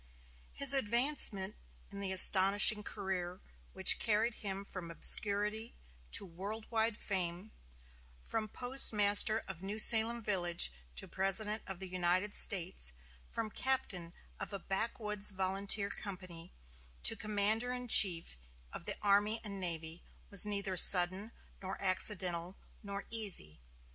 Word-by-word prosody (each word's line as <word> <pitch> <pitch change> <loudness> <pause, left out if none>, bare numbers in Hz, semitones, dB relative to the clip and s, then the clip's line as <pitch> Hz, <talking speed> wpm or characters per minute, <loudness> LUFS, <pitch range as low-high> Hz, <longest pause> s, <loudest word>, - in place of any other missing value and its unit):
His 280 0 +5
advancement 235 -5 -1 0.3
in 200 - -11
the 195 -1 -5
astonishing 195 +3 +6
career 185 -3 -8 0.3
which 190 0 +4
carried 220 +2 -2
him 195 -2 -7
from 185 -4 -9
obscurity 210 +6 +2 0.4
to - - +1
world 200 +5 -10
wide 220 -1 -2
fame; 185 +1 -6 0.7
from 220 -1 -5
postmaster 215 -3 +3
of 185 -3 -11
New 200 +2 -8
Salem 225 +1 +4
village 175 - -1 0.2
to 60 - -6
President 205 +3 -3
of 190 -1 -9
the 190 +1 -9
United 185 +3 -3
States; 180 - -2 0.3
from 220 -2 -7
captain 195 -11 -2 0.2
of - - -8
a 200 - -6
backwoods 210 +1 -4
volunteer 195 +1 -1
company 180 -3 -7 0.5
to - - +6
commander 215 +3 -4
in 250 0 -8
chief 170 - +6 0.4
of - - -11
the - - -4
army 205 +2 -1
and 200 -2 -9
navy, 165 -2 -7 0.3
was 200 0 +9
neither 200 -2 -5
sudden, 185 +5 +2 0.3
nor 190 0 -9
accidental, 185 -2 -3 0.2
nor 200 -1 -10
easy. 190 - -1
200 Hz, 125 wpm, -31 LUFS, 185-215 Hz, 0.7 s, was